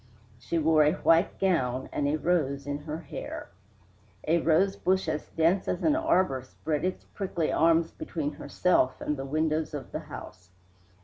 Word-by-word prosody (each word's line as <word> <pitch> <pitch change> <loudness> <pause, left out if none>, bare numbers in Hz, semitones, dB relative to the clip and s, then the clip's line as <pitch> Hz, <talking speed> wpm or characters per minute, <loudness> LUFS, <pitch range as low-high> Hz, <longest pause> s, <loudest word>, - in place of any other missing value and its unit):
She 150 +8 -2
wore 160 -1 +4
a 150 +1 +3
white 165 +3 +3
gown 130 -9 +1
and 140 - -1
a 145 - +1
rose 145 -4 0
in 145 0 -3
her 155 0 -4
hair. - - -7 0.8
A 165 +2 +4
rosebush 185 +2 +2
as 155 -1 -2
dense 170 +4 +2
as - - -2
an 305 -2 +4
arbor 185 - +2
spread 150 +4 -4
its 185 0 -2
prickly 185 -5 -3
arms 165 0 +3
between 150 -3 -4
herself 145 -2 +1
and 150 - -2
the 135 -1 -5
windows 155 +2 -1
of 140 - -7
the - - -3
house. 90 -1 -10
160 Hz, 165 wpm, -28 LUFS, 145-175 Hz, 0.8 s, wore